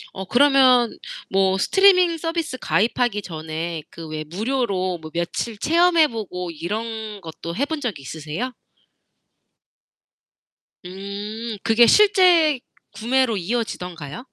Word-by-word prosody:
어 190 - -5
그러면 255 0 +4 0.4
뭐 190 0 +2
스트리밍 365 - +4
서비스 330 -5 -3
가입하기 225 -1 0
전에 160 0 -5
그 165 -1 -10
왜 155 0 -4
무료로 190 - -2
뭐 155 0 -10
며칠 175 +6 -3
체험해 335 +4 +4
보고 180 - -5
이런 215 +5 -5
것도 165 0 -8
해 280 +6 0
본 320 0 -4
적이 210 - -4
있으세요? 160 - -5 2.3
음. 205 +4 -6
그게 230 +1 +5
실제 360 -9 +5 0.3
구매로 230 +2 0
이어지던가요? 180 -7 -4
220 Hz, 240 characters per minute, -22 LUFS, 180-260 Hz, 2.3 s, 그게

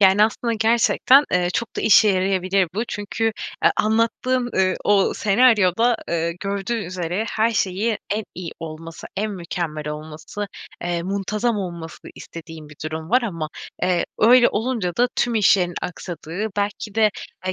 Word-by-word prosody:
Yani, 195 +2 +6
aslında, 230 +2 -1
gerçekten, 235 +5 +4
eee, 180 -1 +2
çok 235 - -3
da - - -1
işe 215 0 +6
yarayabilir 185 -1 +1
bu 225 +3 -1
çünkü, 205 +2 -3 0.4
eee, - - +7
anlattığın, 230 +3 +1
eee, 185 -1 +2
o 200 -2 +3
senaryoda, 225 0 +3
eee, 170 0 0
gördüğü 200 +3 -2
üzere 180 +3 -3
her 220 +1 +2
şeyi 210 +1 0
en 210 +1 -1
iyi 175 -2 -6
olması, 165 0 -8
en 215 +2 -1
mükemmel 170 -5 -4
olması, 155 +7 -6 0.4
eee, 175 -1 -1
muntazam 200 +5 -1
olmasını 170 -4 -7
istediğin 160 -2 -10
bir 145 - -14
durum 160 +1 -5
var. 250 +1 +4
Ama, 165 -8 -3 0.3
eee, 180 -1 +2
öyle 240 +2 +6
olunca 220 -6 -2
da 245 +1 +3
tüm 240 -1 +1
işlerin 185 -4 +3
aksadığı, 180 +3 -5
belki 205 0 -3
de, 220 -1 +4 0.4
eee, 185 - 0
195 Hz, 150 wpm, -22 LUFS, 175-220 Hz, 0.4 s, eee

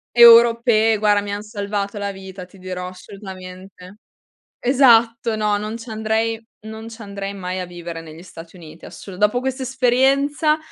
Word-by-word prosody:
Europee, 230 -1 +6
guarda, 205 -1 +3
mi 205 - -6
han 205 0 -4
salvato 205 -1 -4
la 200 0 -3
vita, 190 -1 -10
ti 185 +1 -19
dirò, 180 0 -6
assolutamente! 185 0 -11 0.6
Esatto, 235 -3 +3
no, 210 -1 0
non 215 +2 -5
ci 230 +1 -11
andrei 220 +1 -1 0.2
non 220 +1 -9
ci 230 0 -12
andrei 200 -1 -6
mai 185 -1 -5
a 180 - -4
vivere 175 -2 -8
negli 160 +1 -12
Stati 170 0 -13
Uniti 160 -1 -14
assolu 195 - -11
dopo 210 +4 +2
questa 265 0 -3
esperienza, 270 +4 +2
210 Hz, 155 wpm, -20 LUFS, 185-230 Hz, 0.6 s, Europee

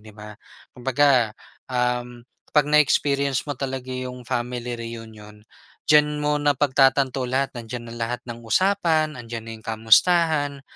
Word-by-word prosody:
'di 110 0 -15
ba? 105 0 -10 0.4
Kumbaga, 125 -3 +2 0.3
um, 125 -1 -2 0.3
'pag 150 - +6
na-experience 140 -2 +2
mo 145 - -3
talaga 130 -1 -5
yung 125 -1 -6
family 120 +1 -3
reunion, 110 -2 -10 0.5
diyan 150 0 +4
mo 150 0 +1
napagtatanto 135 -2 +2
lahat, 135 +2 0
nandiyan 120 0 -7
na 115 - -8
lahat 120 +1 -2
ng 120 -1 -8
usapan, 165 - +2
nandiyan 115 -1 -7
na 115 - -8
yung - - -20
kamustahan, 145 +6 +3
125 Hz, 135 wpm, -23 LUFS, 115-145 Hz, 0.5 s, pag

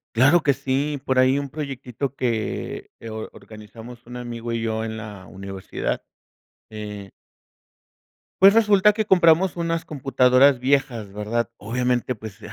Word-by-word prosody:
Claro 145 +9 +5
que 140 - +4
sí, 140 +2 -2
por 130 -2 0
ahí 130 +2 +4
un 140 -1 -5
proyectito 135 -2 -5
que, 115 -5 -3
eh, 115 - -8
or 110 0 -6
organizamos 115 +3 -12
un 125 - -10
amigo 120 -1 -6
y 115 -1 -2
yo 110 0 -2
en 110 0 -5
la 105 -4 -9
universidad, 95 0 -5 0.7
eh 105 -2 -8 1.3
pues 195 +1 +9
resulta 210 -2 +5
que 215 -1 -1
compramos 180 -1 +4
unas 165 -1 -2
computadoras 135 -1 +3
viejas, 125 -6 0
¿verdad? 110 +3 -2
Obviamente, 125 +3 -1
pues, 110 -1 -10
125 Hz, 140 wpm, -23 LUFS, 110-140 Hz, 1.3 s, pues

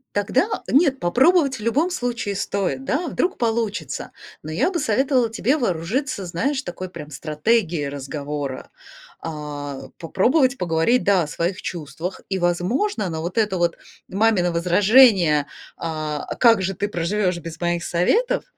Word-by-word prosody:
Тогда, 250 - 0
нет, 275 -2 +3
попробовать, 270 - +3
в - - -10
любом 280 +11 +1
случае, 240 - -2
стоит, 200 +6 -2
да, 295 +6 -1
а - - -3
вдруг 365 +2 -1
получится. 220 - -2 0.3
Но 155 - -6
я 170 - +1
бы 360 - -2
советовала 255 -1 +1
тебе 240 +5 +1
вооружиться, 225 - -2
знаешь, 260 - -1
такой 185 -3 -6
прям 150 -4 -9
стратегией 155 - 0
разговора. 140 0 -5 0.5
А, 145 -3 -6 0.2
попробовать 255 - +2
поговорить, 175 +8 +2
да, 195 -3 +4
о - - -3
своих 170 +5 -3
чувствах 165 +2 -5
и, 190 - -1
возможно, 185 - 0
на 160 -2 -4
вот 175 +6 -3
это 210 -4 +1
вот 175 -1 +1 0.3
мамино 195 -3 +2
возражение, 180 - +5 0.3
а: 155 -2 -3
"А - - -3
как 230 -4 +5
же 190 +1 -1
ты 205 - -2
проживешь 185 0 -1
без 165 -1 -8
моих 175 -1 0
советов?"- 460 - +1
190 Hz, 150 wpm, -22 LUFS, 165-245 Hz, 0.5 s, возражение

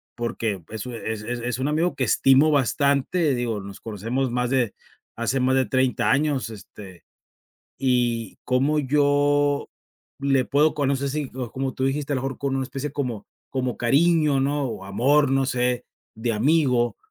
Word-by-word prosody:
porque 115 -4 -2
pues 110 +2 -7
u 125 - -6
e 115 - -4
es 110 - -7
es 120 +2 -4
es 120 +1 -3
un 130 - 0
amigo 165 +4 0
que 135 - -1
estimo 135 +6 +4
bastante, 140 +3 +2
digo, 120 -3 -2
nos 100 0 -10
conocemos 115 +5 -2
más 125 0 0
de 125 -5 +1 0.4
hace 115 +4 0
más 130 +1 +2
de 130 -1 +3
30 130 +3 +1
años, 140 -3 +1
este, 100 -3 -12 0.8
y 120 -4 0
cómo 135 +4 +1
yo 145 0 +2 0.5
le 135 -2 +2
puedo 150 +4 +2
con 145 -2 0
no 140 - +2
sé 140 +1 -2
si, 145 -1 -3
o 125 -3 -5
como 135 0 -2
tú 130 - -2
dijiste 145 +2 -2
a - - +1
lo 130 - -3
mejor 135 -1 -4
con 140 -1 -1
una 135 - 0
especie 135 +2 -5
como 125 -8 -4 0.2
como 130 -3 -2
cariño, 150 +2 +3
¿no?, 140 +1 0
o 115 -5 -6
amor, 135 +8 +2
no 135 0 +2
sé, 125 -1 0 0.3
de 115 +1 -1
amigo, 125 0 +2
130 Hz, 180 wpm, -24 LUFS, 120-140 Hz, 0.8 s, estimo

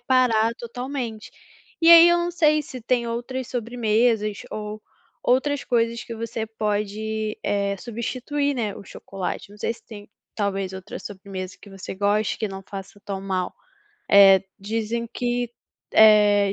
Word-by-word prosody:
parar 235 -3 +3
totalmente. 245 -2 -5 0.5
E 330 - +4
aí, 335 0 +10
eu 345 - +4
não 345 0 -1
sei 305 -3 +3
se 255 -2 -9
tem 240 0 0
outras 245 +2 -4
sobremesas 225 -3 0
ou 210 0 -6 0.4
outras 265 +1 +1
coisas 230 -1 0
que 230 - -7
você 225 0 -4
pode, 215 0 -2
eh, 200 -1 0
substituir, 255 +6 -2
né, 215 -5 -2
o - - -10
chocolate, 195 0 -6
não 205 - -14
sei 230 - -1
se - - -17
tem, 205 -3 -11 0.3
talvez 195 -2 -2
outra 190 - -7
sobremesa 190 -2 -7
que 205 - -14
você 195 -1 -7
goste, 205 +2 +1
que 220 - -1
não 195 0 -7
faça 195 +1 -9
tão 195 -1 -4
mal. 185 -2 -2 0.6
Eh, 195 -1 +8 0.2
dizem 225 +3 -2
que, 245 0 -2 0.4
eh, 210 -2 +6
220 Hz, 150 wpm, -24 LUFS, 200-245 Hz, 0.6 s, aí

